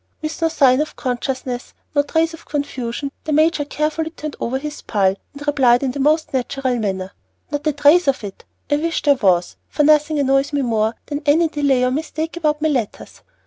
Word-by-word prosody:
With 310 Hz, +1 st, -5 dB
no 330 Hz, -, +4 dB
sign 275 Hz, -4 st, +4 dB
of 305 Hz, -, -4 dB
consciousness, 255 Hz, 0 st, -4 dB, 0.2 s
no 285 Hz, -, +4 dB
trace 320 Hz, +3 st, 0 dB
of 325 Hz, -, -13 dB
confusion, 280 Hz, -2 st, -3 dB
the 310 Hz, -, -2 dB
major 310 Hz, 0 st, +3 dB
carefully 310 Hz, +2 st, -2 dB
turned 305 Hz, -2 st, -7 dB
over 255 Hz, +3 st, -1 dB
his 295 Hz, +2 st, -6 dB
pile, 195 Hz, -3 st, +1 dB, 0.2 s
and 290 Hz, +1 st, -9 dB
replied 265 Hz, -4 st, +3 dB
in 265 Hz, -, 0 dB
the 280 Hz, -, -6 dB
most 310 Hz, +3 st, +2 dB
natural 260 Hz, -1 st, -1 dB
manner, 190 Hz, -3 st, -3 dB, 0.4 s
"Not 290 Hz, +1 st, -2 dB
a -, -, +4 dB
trace 295 Hz, +4 st, +4 dB
of 270 Hz, -4 st, +1 dB
it; 200 Hz, -2 st, -8 dB, 0.3 s
I 290 Hz, -, +4 dB
wish 330 Hz, +2 st, -2 dB
there 290 Hz, -, +5 dB
was, 185 Hz, -9 st, +1 dB
for 295 Hz, -, +1 dB
nothing 300 Hz, +1 st, +4 dB
annoys 275 Hz, +1 st, +2 dB
me 285 Hz, -1 st, +1 dB
more 225 Hz, -2 st, 0 dB
than 290 Hz, 0 st, -4 dB
any 320 Hz, +3 st, +4 dB
delay 280 Hz, -4 st, +1 dB
or 250 Hz, -, +2 dB
mistake 315 Hz, +3 st, -3 dB
about 305 Hz, -2 st, 0 dB
my 315 Hz, -, +3 dB
letters." 245 Hz, -8 st, -3 dB
285 Hz, 200 wpm, -20 LUFS, 255-305 Hz, 0.4 s, there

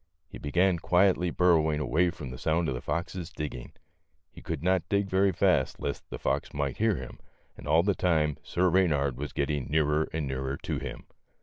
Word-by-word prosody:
He -, -, -10 dB
began 90 Hz, +4 st, +2 dB
quietly 90 Hz, 0 st, +3 dB
burrowing 80 Hz, -4 st, +3 dB
away 80 Hz, +5 st, +2 dB
from 75 Hz, -7 st, -7 dB
the 65 Hz, -, -8 dB
sound 80 Hz, +2 st, +1 dB
of 65 Hz, -, -1 dB
the 60 Hz, -, -5 dB
fox's 85 Hz, +2 st, -3 dB
digging. 75 Hz, -8 st, -6 dB, 0.6 s
He -, -, -13 dB
could -, -, -5 dB
not 95 Hz, 0 st, +3 dB
dig 100 Hz, -1 st, +1 dB
very 95 Hz, +1 st, +3 dB
fast 85 Hz, -6 st, +1 dB
lest 70 Hz, -, -4 dB
the -, -, -5 dB
fox -, -, -2 dB
might 70 Hz, -2 st, -2 dB
hear 110 Hz, -1 st, +2 dB
him, 65 Hz, -5 st, -8 dB, 0.4 s
and -, -, -11 dB
all 80 Hz, +3 st, +4 dB
the 100 Hz, +1 st, +2 dB
time 80 Hz, -6 st, +1 dB
Sir 90 Hz, +1 st, +1 dB
Eeynard 75 Hz, -8 st, +2 dB
was 70 Hz, +3 st, -5 dB
getting 70 Hz, -2 st, -1 dB
nearer 75 Hz, 0 st, +1 dB
and 80 Hz, -2 st, -2 dB
nearer 65 Hz, +1 st, -3 dB
to -, -, -3 dB
him. -, -, -7 dB
80 Hz, 195 wpm, -28 LUFS, 70-90 Hz, 0.6 s, all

